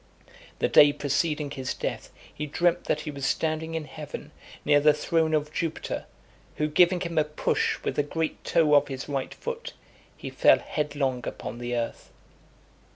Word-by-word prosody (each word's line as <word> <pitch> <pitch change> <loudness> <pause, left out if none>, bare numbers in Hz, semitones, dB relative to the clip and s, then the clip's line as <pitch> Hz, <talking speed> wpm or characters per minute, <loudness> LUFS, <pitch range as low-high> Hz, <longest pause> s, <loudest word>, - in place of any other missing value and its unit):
The - - +1
day 145 0 +7
preceding 150 +1 -1
his 135 -2 -4
death - - -4 0.2
he 150 - -4
dreamt 175 +4 +1
that 150 - 0
he 150 - -5
was 140 -1 -8
standing 160 +3 -1
in 160 -2 -3
heaven 150 0 -8 0.3
near 145 0 +5
the 150 +1 +5
throne 160 +1 +1
of 150 0 -2
Jupiter, 165 -1 -3 0.5
who 150 - 0
giving 175 +3 +4
him 170 -3 0
a - - +4
push 150 0 0
with - - -2
the - - +5
great 160 +2 -3
toe 155 -3 +3
of 145 0 +5
his 135 -1 -6
right 140 -2 -3
foot, 475 0 -6 0.4
he - - -7
fell - - +5
headlong 140 -4 -2
upon 120 - -6
the 120 0 -3
earth. 115 -1 -4
150 Hz, 170 wpm, -27 LUFS, 145-160 Hz, 0.5 s, day